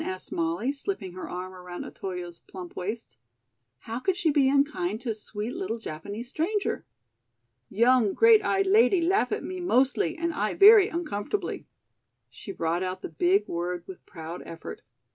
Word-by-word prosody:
asked 185 Hz, 0 st, -6 dB
Molly, 170 Hz, +10 st, 0 dB
slipping 275 Hz, -, -5 dB
her 185 Hz, -, -7 dB
arm 185 Hz, +1 st, -6 dB
around 180 Hz, -1 st, -8 dB
Otoyo's 180 Hz, -3 st, -6 dB
plump 180 Hz, -2 st, -10 dB
waist. 185 Hz, -, -5 dB, 0.6 s
"How 225 Hz, +2 st, -5 dB
could 375 Hz, +7 st, 0 dB
she 335 Hz, -7 st, +2 dB
be 275 Hz, -2 st, +4 dB
unkind 275 Hz, -9 st, +1 dB
to 235 Hz, -2 st, -2 dB
sweet 215 Hz, +3 st, -6 dB
little 365 Hz, -11 st, -3 dB
Japanese 205 Hz, +4 st, -7 dB
stranger?" 370 Hz, -, -2 dB, 0.8 s
"Young 235 Hz, 0 st, +3 dB
great 455 Hz, -2 st, +6 dB
eyed 390 Hz, 0 st, +2 dB
lady 390 Hz, -1 st, +5 dB
laugh 370 Hz, +5 st, +2 dB
at -, -, -2 dB
me 370 Hz, 0 st, -5 dB
mostly 340 Hz, +2 st, +2 dB
and 335 Hz, 0 st, -1 dB
I 210 Hz, -7 st, -1 dB
very 410 Hz, -1 st, +8 dB
uncomfortably." 330 Hz, -, -3 dB, 0.6 s
She 200 Hz, -, -8 dB
brought 170 Hz, -1 st, -1 dB
out 185 Hz, 0 st, -4 dB
the -, -, -4 dB
big 180 Hz, +6 st, +2 dB
word 175 Hz, +1 st, -3 dB
with 190 Hz, -, -11 dB
proud 165 Hz, 0 st, -8 dB
effort. 165 Hz, 0 st, -8 dB
220 Hz, 160 wpm, -27 LUFS, -, 0.8 s, very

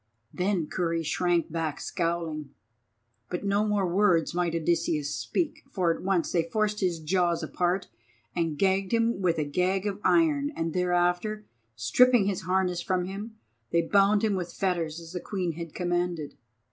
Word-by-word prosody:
Then 180 Hz, -2 st, 0 dB
Kurri 165 Hz, 0 st, -1 dB
shrank 175 Hz, +1 st, 0 dB
back 160 Hz, -2 st, -2 dB
scowling. 165 Hz, -4 st, -3 dB, 0.7 s
But 180 Hz, -, -3 dB
no 200 Hz, +2 st, +2 dB
more 205 Hz, -2 st, +1 dB
words 175 Hz, -3 st, +2 dB
might 175 Hz, -1 st, 0 dB
Odysseus 160 Hz, -3 st, 0 dB
speak, 330 Hz, -4 st, -2 dB
for 180 Hz, -9 st, +1 dB
at -, -, -9 dB
once 185 Hz, -3 st, 0 dB
they 170 Hz, -, +3 dB
forced 210 Hz, +5 st, -1 dB
his 180 Hz, -4 st, 0 dB
jaws 170 Hz, +1 st, +1 dB
apart 180 Hz, +4 st, -1 dB, 0.5 s
and 165 Hz, -3 st, -1 dB
gagged 195 Hz, +3 st, +1 dB
him 230 Hz, -3 st, +2 dB
with 170 Hz, -3 st, +2 dB
a 155 Hz, -, +1 dB
gag 185 Hz, +6 st, 0 dB
of 205 Hz, 0 st, -3 dB
iron; 300 Hz, -4 st, +3 dB
and 165 Hz, -1 st, -2 dB
thereafter, 180 Hz, +4 st, +1 dB, 0.3 s
stripping 235 Hz, -, +4 dB
his 195 Hz, -2 st, -1 dB
harness 185 Hz, -2 st, +1 dB
from 180 Hz, 0 st, 0 dB
him, 205 Hz, +4 st, -7 dB, 0.3 s
they 170 Hz, 0 st, +2 dB
bound 200 Hz, +4 st, +3 dB
him 215 Hz, -2 st, +2 dB
with 180 Hz, -2 st, -3 dB
fetters 170 Hz, -4 st, -1 dB
as 165 Hz, +1 st, -11 dB
the 180 Hz, -, -3 dB
Queen 185 Hz, -2 st, -2 dB
had 165 Hz, 0 st, -8 dB
commanded. 175 Hz, -4 st, -1 dB
180 Hz, 160 wpm, -27 LUFS, 170-195 Hz, 0.7 s, stripping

